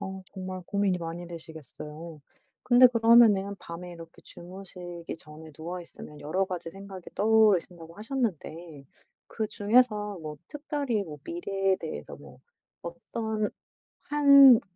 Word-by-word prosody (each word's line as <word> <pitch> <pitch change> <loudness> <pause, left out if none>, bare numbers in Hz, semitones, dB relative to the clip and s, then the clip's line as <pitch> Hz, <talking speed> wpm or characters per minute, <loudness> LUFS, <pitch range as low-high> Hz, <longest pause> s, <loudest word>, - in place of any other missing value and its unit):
어 190 0 -6
정말 185 -1 -6
고민이 200 -3 +1
많이 170 +1 -6
되시겠어요. 160 -1 -10 0.4
근데 250 +1 +7
그러면은 225 -4 +5
밤에 175 +1 -8
이렇게 165 -1 -12
주무시기 175 -2 -9
전에 155 +1 -11
누워 170 +4 -6
있으면 150 -3 -11
여러 180 +6 0
가지 180 -3 -6
생각이 195 -1 -10
떠오르신다고 190 -6 +2
하셨는데 175 - -4 0.4
그 220 - -3
중에서 210 -2 +2
뭐 150 -1 -7
특별히 285 -7 -2
뭐 150 -4 -9
미래에 195 - -1
대해서 - - -7
뭐 - - -15 0.4
어떤 220 -2 -3 0.5
1 280 -4 +7
190 Hz, 285 characters per minute, -28 LUFS, 170-220 Hz, 0.5 s, 근데